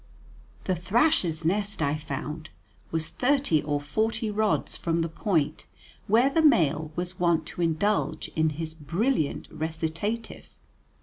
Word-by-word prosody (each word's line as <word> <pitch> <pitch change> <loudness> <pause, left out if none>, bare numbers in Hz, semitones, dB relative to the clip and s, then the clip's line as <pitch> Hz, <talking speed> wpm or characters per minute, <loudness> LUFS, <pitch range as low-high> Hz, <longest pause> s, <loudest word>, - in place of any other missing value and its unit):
The 185 - 0
thrasher's 180 - +1
nest 200 +4 0
I 145 -1 +1
found 155 +1 -5 0.4
was 160 -1 -1
thirty 260 - +2
or 145 0 -1
forty 220 +8 -1
rods 215 0 0
from 165 0 0
the - - -1
point 160 -3 -1 0.4
where 235 +7 +4
the 325 - +3
male 160 - +3
was 180 +1 -4
wont 170 -2 +2
to - - -5
indulge 170 +6 0
in 160 0 +1
his 160 -1 -4
brilliant 160 - -1
recitative. 165 +8 -4
170 Hz, 130 wpm, -27 LUFS, 155-210 Hz, 0.4 s, where